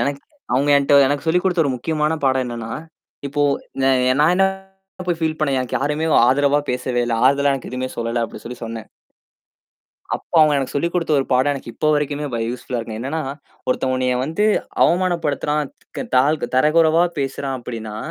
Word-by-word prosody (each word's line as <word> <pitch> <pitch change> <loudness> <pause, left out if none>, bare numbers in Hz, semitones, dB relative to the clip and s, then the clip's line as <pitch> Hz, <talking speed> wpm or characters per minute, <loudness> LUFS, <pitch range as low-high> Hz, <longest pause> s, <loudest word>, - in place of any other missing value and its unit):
எனக்கு 140 0 -1 0.3
அவங்க 140 +3 +1
என்ட்ட 140 0 +4
எனக்குச் 145 +3 -2
சொல்லிக் 180 +3 +2
கொடுத்த 180 -3 +2
ஒரு 140 - 0
முக்கியமான 155 +4 -1
பாடம் 130 -1 +2
என்னன்னா, 115 -1 -6 0.6
இப்போ 145 +1 -1 0.4
நா 135 - +4 0.3
நான் 155 +4 +5
என்ன 195 - +5 0.6
போய் 170 -2 0
ஃபீல் 160 -1 -1
பண்ணேன், 140 -4 +1
எனக்கு 130 - -2
யாருமே 150 +3 -1 0.2
ஆதரவா 140 +2 +3
பேசவே 125 0 -1
இல்ல. 115 - 0
ஆறுதல 140 +1 +4
எனக்கு 130 - -7
எதுவுமே 130 0 -3
சொல்லல 115 0 -1
அப்படி - - -11
சொல்லி 125 +1 -7
சொன்னேன். 115 -1 -7 1.3
அப்ப - - -8
அவங்க 155 -2 +5
எனக்குச் 135 0 -3
சொல்லிக் 170 +4 -1
கொடுத்த 165 -3 0
ஒரு 135 - -1
பாடம் 130 +3 +3
எனக்கு 125 -3 -8
இப்ப 155 - 0
வரைக்குமே 145 0 -1
வ - - -1
யூஸ்ஃபுல்லா 125 0 -4
இருக்கு. 110 -1 -6
என்னன்னா, 140 +6 -3 0.5
ஒருத்தன் 130 0 0
உன்னைய 130 -1 0
வந்து 165 +8 -1 0.4
அவமானப்படுத்துறான், 155 -5 +1 0.3
தக் - - -5
தா 125 - +6 0.2
த - - -4
தரகுறைவா 160 +4 +4
பேசுறான் 135 0 -2
அப்படின்னா, 110 -3 -6
140 Hz, 175 wpm, -20 LUFS, 125-155 Hz, 1.3 s, தா